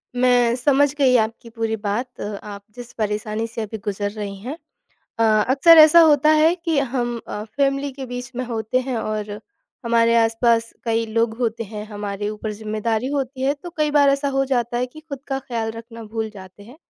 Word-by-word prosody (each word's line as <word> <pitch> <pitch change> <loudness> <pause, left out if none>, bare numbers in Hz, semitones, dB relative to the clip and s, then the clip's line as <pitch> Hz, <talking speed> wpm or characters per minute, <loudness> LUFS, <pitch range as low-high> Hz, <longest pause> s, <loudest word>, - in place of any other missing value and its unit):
मैं 245 -1 +3
समझ 285 +2 +2
गई 265 -3 +3
आपकी 225 +1 -2
पूरी 225 -1 -2
बात 220 +4 -4
अ, 205 0 -4
आप 200 -1 -9
जिस 245 -1 -10
परेशानी 215 +1 -2
से 230 0 -6
अभी 220 +1 -5
गुज़र 205 0 -2
रही 205 -2 -6
हैं। 255 +10 -6 0.6
अ, - - +2 0.3
अक्सर 320 +5 +7
ऐसा 310 +2 +9
होता 305 -2 +5
है 320 +3 +4
कि 330 -4 -1
हम 240 -3 -1
अ, 210 - -4
फ़ैमिली 275 +4 -1
के 265 -1 -7
बीच 245 0 -6
में 255 - -2
होते 230 +1 -1
हैं 255 - -2
और 215 -1 -3 0.5
हमारे 230 0 +3
आस-पास 230 0 +2
कई 230 0 0
लोग 225 0 0
होते 230 -2 -1
हैं, 210 0 -7
हमारे 205 -1 -4
ऊपर 215 0 -5
ज़िम्मेदारी 215 +2 -2
होती 265 -1 -3
है 280 +2 +2
तो 350 +4 -10
कई 305 -1 +1
बार 290 -1 +4
ऐसा 280 0 0
हो 270 - +3
जाता 240 -3 -1
है 250 - 0
कि 310 +5 -14
ख़ुद 300 -4 -8
का 270 - -1
ख़्याल 235 -4 -3
रखना 230 +1 -10
भूल 220 0 -4
जाते 190 +1 -12
हैं। 240 +7 -14
235 Hz, 200 wpm, -21 LUFS, 220-270 Hz, 0.6 s, ऐसा